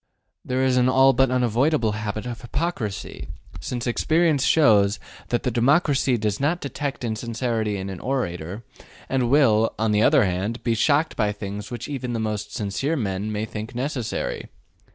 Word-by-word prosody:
There 130 +1 -1
is 130 -1 +2
an 125 0 +4
all 135 +1 +5
but 130 +1 +3
unavoidable 125 +1 +2
habit 105 +1 -4
of 120 -2 -6
hypocrisy, 120 - -4 0.3
since 120 -1 -4
experience 155 +3 +2
shows 105 -11 +4 0.3
that 120 - 0
the 125 - 0
democracy 135 +1 +2
does 105 -2 -1
not 155 +5 +1
detect 140 -2 -4
insincerity 115 -2 -2
in 95 0 -5
an 95 -2 -6
orator, 100 -6 -3 0.5
and 130 -3 +1
will, 115 -6 +4
on 110 0 +1
the 105 0 +3
other 120 - +5
hand, 95 +5 -2
be 115 - +1
shocked 145 +7 +2
by 105 -1 +1
things 105 0 -6
which 120 -1 -6
even 130 -4 -4
the 115 - -2
most 105 -1 -3
sincere 110 +10 -2
men 105 -4 -2
may 105 +1 -2
think 110 +1 -7
necessary. 125 -2 -3
120 Hz, 165 wpm, -23 LUFS, 105-135 Hz, 0.5 s, all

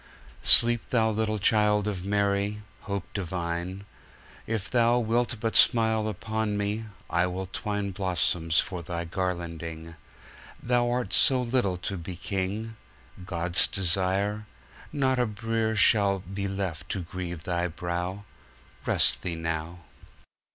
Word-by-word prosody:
Sleep, 120 -1 +6
Thou 110 -2 +2
little 110 0 -1
Child 105 0 +3
of 95 -4 -3
Mary, 100 +1 0 0.2
Hope 100 -2 -2
divine. 90 +1 -4 0.6
If 110 -3 -2
Thou 120 +1 +3
wilt 120 0 0
but 115 0 -2
smile 110 -2 +4
upon 110 +1 -2
me, 105 +2 -2 0.2
I 90 +1 +1
will 95 +1 -4
twineBlossoms 95 -4 0
for 90 -3 -2
Thy 85 0 -4
garlanding. 85 -2 -4 0.6
Thou'rt 120 -3 0
so 130 -2 +5
little 115 -7 0
to 95 +2 -4
be 90 +1 -6
King, 100 +5 -3 0.5
God's 85 +1 +3
Desire! 95 +3 -1 0.4
Not 130 -3 +1
a 125 - +2
brierShall 110 -3 +2
be 100 0 -2
left 95 -5 -4
to 95 - -2
grieve 85 -1 -6
Thy 90 0 -1
brow; 90 +3 -4 0.6
Rest - - +4
Thee 85 -2 -3
now. 80 +1 -4
100 Hz, 120 wpm, -27 LUFS, 90-110 Hz, 0.6 s, Sleep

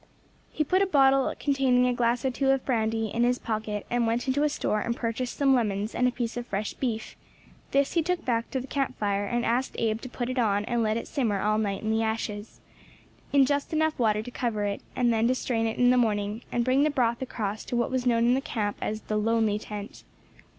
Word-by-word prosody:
He 305 - 0
put 370 +6 +2
a 395 - +3
bottle 270 -5 +4
containing 265 -3 +2
a 250 - +2
glass 240 +1 0
or 260 - +2
two 270 +2 0
of 270 -1 +2
brandy 225 -3 0
in 235 - 0
his 245 +1 +2
pocket, 215 -3 -3
and 240 -1 +1
went 235 +3 -1
into 265 +2 +1
a 300 - +3
store 215 -6 -1
and 235 +2 -2
purchased 240 +1 -3
some 275 -2 +4
lemons 210 -3 0
and 250 - +2
a - - +1
piece 240 -1 -3
of 240 0 -5
fresh 200 +1 -3
beef; 225 -4 -3 0.5
this 275 0 +1
he 335 - +3
took 355 +2 -2
back 230 -3 0
to 265 - -2
the 255 - -6
camp 275 0 -2
fire, 205 -1 -1
and 240 +2 -1
asked 245 +3 0
Abe 220 -1 0
to 255 - -7
put 240 0 -4
it 255 - -2
on 205 -3 +1
and 240 0 0
let 220 0 +1
it - - -5
simmer 225 -9 0
all 215 +1 +1
night 200 -2 -2
in 220 - 0
the 220 0 +1
ashes, 220 -1 -3 0.7
in 280 -1 +5
just 285 +3 -1
enough 315 -1 +1
water 215 -2 +2
to 245 - -8
cover 230 -4 -2
it, 200 -1 -2
and 240 -2 +2
then 225 +1 +2
to 255 - +2
strain 225 -3 -1
it 225 - -3
in 245 0 +5
the 250 - +4
morning, 210 -2 0
and 240 -1 0
bring 260 +2 +3
the 305 - +3
broth 240 -4 0
across 215 -5 -3
to - - -3
what 235 +1 0
was 255 -1 -1
known 230 -1 +3
in 240 - +4
the 265 - +1
camp 210 -6 -2
as 215 0 -3
the 215 - -2
"lonely 220 -1 +1
tent." 210 -1 -8
235 Hz, 245 wpm, -27 LUFS, 220-260 Hz, 0.7 s, in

